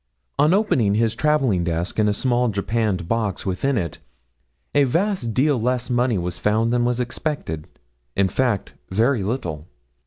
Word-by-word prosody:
'On 150 +2 +5
opening 135 - +2
his 110 0 +2
travelling 135 - +2
desk 85 +4 -2
and 105 -1 +4
a - - +3
small 125 +2 +1
japanned 105 -3 -1
box 110 -3 -1
within 120 +8 0
it 85 -6 -3 0.7
a 145 - +5
vast 175 - 0
deal 135 -2 +2
less 125 +1 -1
money 120 -2 +2
was 90 -1 -3
found 110 +4 +1
than 120 0 +2
was 125 0 0
expected 120 - -3 0.5
in 100 - +3
fact, 115 0 -1 0.2
very 115 +5 +2
little. 95 - -3
115 Hz, 155 wpm, -22 LUFS, 100-130 Hz, 0.7 s, On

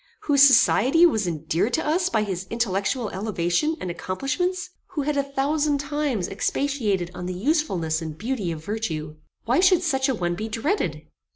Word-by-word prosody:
Whose 285 -2 +3
society 275 - +6
was 220 - +2
endeared 165 +7 -1
to 320 - 0
us 350 +4 +1
by 220 -2 +1
his 190 -2 -4
intellectual 225 +1 -1
elevation 195 - -1
and 180 - -4
accomplishments? 315 - -2 0.2
Who 295 -5 -1
had 300 +1 -1
a 280 - +3
thousand 285 +2 0
times 280 -8 -2
expatiated 210 -6 -1
on 180 0 -6
the 180 - -4
usefulness 190 - 0
and 160 -1 -6
beauty 215 -4 -2
of 160 -1 -7
virtue? 160 -8 -4 0.3
Why 245 +6 +2
should 365 -1 +4
such 270 -4 +1
a 265 - +1
one 175 -4 -1
be 215 +5 -4
dreaded? 260 - -1
230 Hz, 170 wpm, -24 LUFS, 180-290 Hz, 0.3 s, society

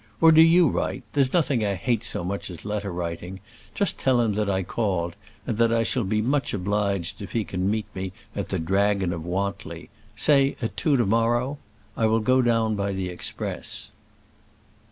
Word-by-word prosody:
Or 165 0 +7
do 160 0 +7
you 165 +1 +6
write. - - -2
There's 135 -3 +3
nothing 140 -9 +2
I 100 -1 0
hate 115 +4 0
so 90 - -3
much 100 +3 -4
as 85 -2 -9
letter 105 -2 -3
writing; 90 +2 -5 0.4
just - - 0
tell 130 -2 +3
him 115 -3 +2
that 105 0 -1
I 95 -1 0
called, 90 -5 -2 0.3
and 115 -3 -3
that 115 -1 +4
I 115 0 +2
shall 120 +2 0
be 105 +2 0
much 135 -1 0
obliged 100 -2 -1
if 100 - -8
he 115 - +1
can 95 0 -2
meet 110 0 -1
me 95 0 -4 0.2
at - - -3
the - - -1
Dragon 95 +1 +1
of 85 -2 -5
Wantly 95 +3 -4 0.2
say 140 -2 +4
at 115 - -3
two 145 -4 +2
to 120 - +2
morrow. 120 +6 +1 0.4
I 110 - +2
will 110 +1 +3
go 130 +4 +3
down 115 -2 +2
by 100 -1 -1
the 95 -1 -3
express." 90 - -4
105 Hz, 195 wpm, -25 LUFS, 95-120 Hz, 0.4 s, Or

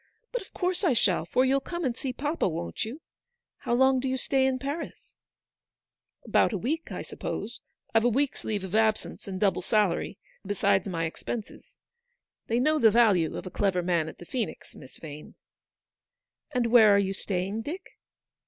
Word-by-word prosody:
But - - -2
of 385 - -14
course 365 +1 -1
I 335 -8 +4
shall, 190 -8 +2
for 255 +9 +2
you'll 270 +1 +3
come 345 +4 -4
and 245 -3 0
see 260 +1 -3
papa, 295 +3 -1
won't 85 - -3
you? 255 +9 -7 0.6
How 240 - -1
long 265 +1 +4
do 265 - -2
you 260 0 0
stay 265 0 +2
in 260 -1 +1
Paris? 285 +5 -6 0.4
" - - -66
" - - -44
About - - +3
a 210 - -1
week, 300 - -3
I - - -4
suppose. - - -5 0.3
I've 225 0 +4
a - - +5
week's 275 +4 0
leave 210 -3 -2
of 190 0 -7
absence, 220 -1 +1
and 190 -1 -4
double 195 -3 +2
salary, 200 -1 +1 0.3
besides 200 0 +1
my 165 -3 -1
ex 160 - -6
penses. 225 -3 -7 0.7
They 230 +1 +1
know 305 +4 +3
the 225 - +7
value 205 -8 +3
of - - -6
a 185 - -6
clever 190 -3 +1
man 170 -3 +1
at - - -12
the 175 - -11
Phoenix, 235 +3 -4
Miss 130 - -13
Vane." 150 -1 -10 0.6
" - - -60
And 235 -2 +1
where 220 -4 +8
are - - +5
you 195 -1 +1
staying, 195 +2 -2
Dick 320 +10 -7
225 Hz, 195 wpm, -28 LUFS, 190-265 Hz, 0.7 s, where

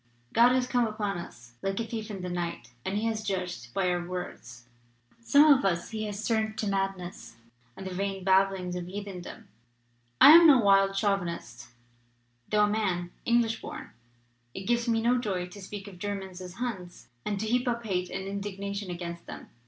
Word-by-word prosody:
God 235 +2 +6
has 255 -1 +2
come 245 -2 +1
upon 205 -4 -3
us 120 -7 -11
like 195 +1 -2
a - - 0
thief 225 -1 -5
in 195 -3 -6
the 180 - -3
night, 175 -9 -4
and 195 +2 -2
He 215 - -1
has 220 -1 -1
judged 180 - -4
by 185 +8 0
our 175 0 -1
words. 175 -10 -7 0.5
Some 285 +5 +6
of 265 - 0
us 175 -1 0
He 215 -1 -3
has 210 +1 -4
turned 220 -1 0
to 220 - -1
madness 195 - -3 0.4
and 190 - -8
the 190 - -5
vain 195 0 -3
babblings 190 -1 +2
of 175 -1 -4
heathen 195 -1 -6
dom. - - -10 0.7
I 285 - +11
am 335 +1 +10
no 285 -4 +8
wild 195 -3 +4
chauvinist; 175 - -2 0.8
though 210 0 +4
a - - +4
man, 190 -5 -1
English 235 -1 +2
born, - - -8 0.6
it 190 - -5
gives 235 +3 +1
me 225 -1 +2
no 245 +1 +3
joy 190 -6 -2
to 200 +3 -11
speak 200 +1 -8
of 185 -3 -11
Ger 205 +1 -2
mans 190 -2 -8
as 180 0 -8
Huns, 195 -8 -5 0.2
and 205 -1 -2
to 220 - -2
heap 245 +3 +1
up 235 -1 -1
hate 180 -3 -1
and 190 +1 -4
indigna 200 0 -4
tion 200 -2 -4
against 170 -1 -6
them. - - -9
195 Hz, 200 wpm, -28 LUFS, 180-220 Hz, 0.8 s, I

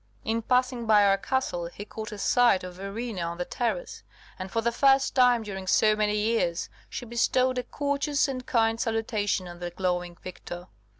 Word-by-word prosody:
In 225 +1 0
passing 250 0 +1
by 210 -2 +6
our 195 0 +3
castle 195 -9 -1
he 200 +4 -9
caught 220 +1 -7
a 210 - -6
sight 240 -2 +3
of 180 0 -7
Verena 195 +2 -5
on 170 0 -3
the 180 - -2
terrace, 250 - -3 0.4
and, 185 +1 -5
for 230 - -1
the 235 +1 +1
first 270 +2 +3
time 250 -3 +4
during 190 -3 -6
so 215 +3 +4
many 210 0 +1
years, 210 -5 0 0.2
she 245 - -6
bestowed 250 +2 +1
a - - -3
courteous 285 +1 0
and 260 -2 -4
kind 225 -1 +2
salutation 215 -4 -1
on 175 0 -10
the 175 0 -4
glowing 180 -1 -2
victor. 175 -1 -8
220 Hz, 185 wpm, -27 LUFS, 185-245 Hz, 0.4 s, by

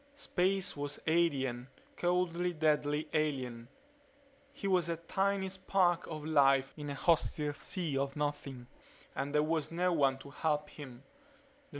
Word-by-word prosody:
Space 190 -7 0
was 145 -1 -3
alien; 135 -7 +1 0.3
coldly, 175 0 0
deadly, 150 -1 +1
alien. 130 -6 -1 0.8
He 200 - -5
was 180 -3 +2
a 165 - -1
tiny 195 +3 0
spark 185 -2 +1
of 155 -2 -6
life 135 -3 +4
in 150 -1 -6
a 140 - -3
hostile 150 -1 +1
sea 155 -1 -3
of 140 0 -2
Nothing 145 -4 -3 0.5
and 140 +1 -2
there 150 0 +3
was 160 0 -1
no 180 +1 +1
one 135 -4 +3
to 135 +1 -12
help 150 0 -1
him. 135 -4 -10
155 Hz, 135 wpm, -33 LUFS, 140-175 Hz, 0.8 s, life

